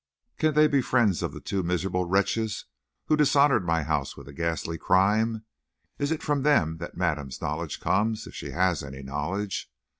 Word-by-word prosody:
Can 155 Hz, -1 st, +2 dB
they 155 Hz, 0 st, +6 dB
be 140 Hz, -2 st, +2 dB
friends 110 Hz, -8 st, +2 dB
of -, -, -2 dB
the -, -, -8 dB
two 100 Hz, -, -2 dB
miserable 90 Hz, +1 st, -1 dB
wretches 100 Hz, +4 st, 0 dB, 0.4 s
who 155 Hz, -, +3 dB
dishonored 145 Hz, -, +4 dB
my 80 Hz, -1 st, +1 dB
house 75 Hz, -3 st, -2 dB
with -, -, -11 dB
a 70 Hz, -, -10 dB
ghastly 80 Hz, +1 st, -2 dB
crime? 110 Hz, +5 st, +2 dB, 0.5 s
Is 145 Hz, +2 st, 0 dB
it 160 Hz, -, -2 dB
from 145 Hz, -2 st, 0 dB
them 85 Hz, -, +3 dB
that 85 Hz, +1 st, -8 dB
madame's 75 Hz, -7 st, -2 dB
knowledge 75 Hz, +1 st, -3 dB
comes, 110 Hz, +3 st, 0 dB
if -, -, -11 dB
she -, -, -6 dB
has 90 Hz, -2 st, +1 dB
any 70 Hz, -1 st, -8 dB
knowledge? 75 Hz, +7 st, -3 dB
95 Hz, 180 wpm, -27 LUFS, 80-115 Hz, 0.5 s, they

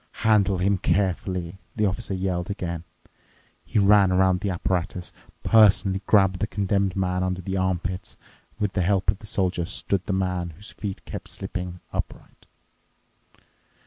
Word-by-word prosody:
"Handle 100 Hz, -3 st, +4 dB
him 95 Hz, +2 st, +1 dB
carefully," 95 Hz, -2 st, -1 dB, 0.2 s
the 110 Hz, -, +2 dB
Officer 100 Hz, 0 st, -1 dB
yelled 90 Hz, -1 st, -2 dB
again. 85 Hz, -4 st, -4 dB, 0.8 s
He -, -, -3 dB
ran 100 Hz, -1 st, +6 dB
around 95 Hz, 0 st, +3 dB
the 100 Hz, -, -2 dB
apparatus, 90 Hz, 0 st, -2 dB, 0.3 s
personally 100 Hz, -3 st, +5 dB
grabbed 95 Hz, -3 st, +4 dB
the 105 Hz, -, 0 dB
Condemned 100 Hz, -2 st, 0 dB
Man 90 Hz, -1 st, 0 dB
under 95 Hz, 0 st, -2 dB
the 95 Hz, +2 st, -3 dB
armpits 90 Hz, -1 st, -2 dB, 0.4 s
and, -, -, -16 dB
with 105 Hz, -2 st, 0 dB
the 95 Hz, -, +1 dB
help 95 Hz, +1 st, +2 dB
of 100 Hz, -, -8 dB
the 110 Hz, -, -10 dB
Soldier, 90 Hz, -4 st, 0 dB
stood 95 Hz, 0 st, -2 dB
the 100 Hz, -, 0 dB
man, 90 Hz, -3 st, -1 dB
whose 100 Hz, +5 st, -9 dB
feet 100 Hz, -3 st, -6 dB
kept -, -, -7 dB
slipping, 90 Hz, -1 st, -5 dB
upright. -, -, -6 dB
95 Hz, 150 wpm, -25 LUFS, 90-100 Hz, 0.8 s, ran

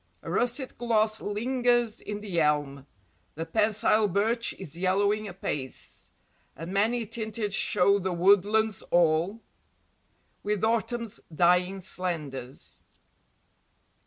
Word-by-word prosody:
A -, -, -6 dB
russet 245 Hz, +2 st, -1 dB
gloss 220 Hz, -2 st, +2 dB
lingers 240 Hz, +1 st, 0 dB
in 210 Hz, 0 st, -6 dB
the 185 Hz, -5 st, -1 dB
elm; 145 Hz, -2 st, 0 dB, 0.5 s
The 165 Hz, +2 st, -4 dB
pensile 215 Hz, +3 st, +2 dB
birch 220 Hz, +5 st, +1 dB
is 165 Hz, -5 st, -8 dB
yellowing 200 Hz, +4 st, +1 dB
apace, 150 Hz, -8 st, -5 dB, 0.4 s
And 165 Hz, +4 st, -7 dB
many 225 Hz, +4 st, +1 dB
tinted 220 Hz, -2 st, -4 dB
show 200 Hz, +2 st, +3 dB
the 190 Hz, -1 st, -2 dB
woodlands 200 Hz, +4 st, +3 dB
all, 175 Hz, +5 st, +2 dB, 1.0 s
With 210 Hz, 0 st, -2 dB
autumn's 230 Hz, 0 st, -1 dB
dying 180 Hz, +3 st, +2 dB
slendours. 155 Hz, -9 st, -4 dB
205 Hz, 100 wpm, -27 LUFS, 175-220 Hz, 1.0 s, show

